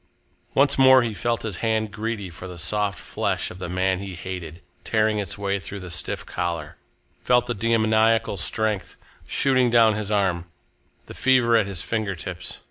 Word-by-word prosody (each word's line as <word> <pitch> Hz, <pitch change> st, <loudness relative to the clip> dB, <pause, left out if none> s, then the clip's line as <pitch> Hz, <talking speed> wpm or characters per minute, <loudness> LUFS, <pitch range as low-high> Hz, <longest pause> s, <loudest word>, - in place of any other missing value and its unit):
Once 140 Hz, 0 st, +3 dB
more 130 Hz, -1 st, +7 dB
he 115 Hz, -2 st, -2 dB
felt 115 Hz, +4 st, -1 dB
his 105 Hz, -6 st, -3 dB
hand 110 Hz, -1 st, 0 dB
greedy 105 Hz, -3 st, -4 dB
for 90 Hz, +2 st, -9 dB
the 90 Hz, -1 st, -9 dB
soft 100 Hz, +3 st, 0 dB
flesh -, -, -2 dB
of 90 Hz, -, -11 dB
the 90 Hz, -, -5 dB
man 95 Hz, +1 st, 0 dB
he 95 Hz, -2 st, -6 dB
hated, 90 Hz, -2 st, -7 dB, 0.2 s
tearing 110 Hz, -1 st, +1 dB
its 100 Hz, -2 st, -3 dB
way 100 Hz, -1 st, -1 dB
through 100 Hz, +1 st, -7 dB
the 90 Hz, -2 st, -8 dB
stiff 85 Hz, -3 st, -3 dB
collar, 85 Hz, -4 st, -3 dB, 0.5 s
felt 125 Hz, -1 st, +3 dB
the 120 Hz, -, -2 dB
demoniacal 110 Hz, 0 st, +2 dB
strength 105 Hz, +3 st, -1 dB, 0.3 s
shooting 130 Hz, -2 st, +2 dB
down 115 Hz, -2 st, +5 dB
his 105 Hz, -1 st, -4 dB
arm, 95 Hz, -5 st, +1 dB, 0.6 s
the -, -, -10 dB
fever 125 Hz, -3 st, +3 dB
at 110 Hz, -3 st, +3 dB
his 95 Hz, -4 st, -3 dB
finger 110 Hz, -4 st, -2 dB
tips. 90 Hz, +1 st, -6 dB
105 Hz, 175 wpm, -24 LUFS, 95-115 Hz, 0.6 s, more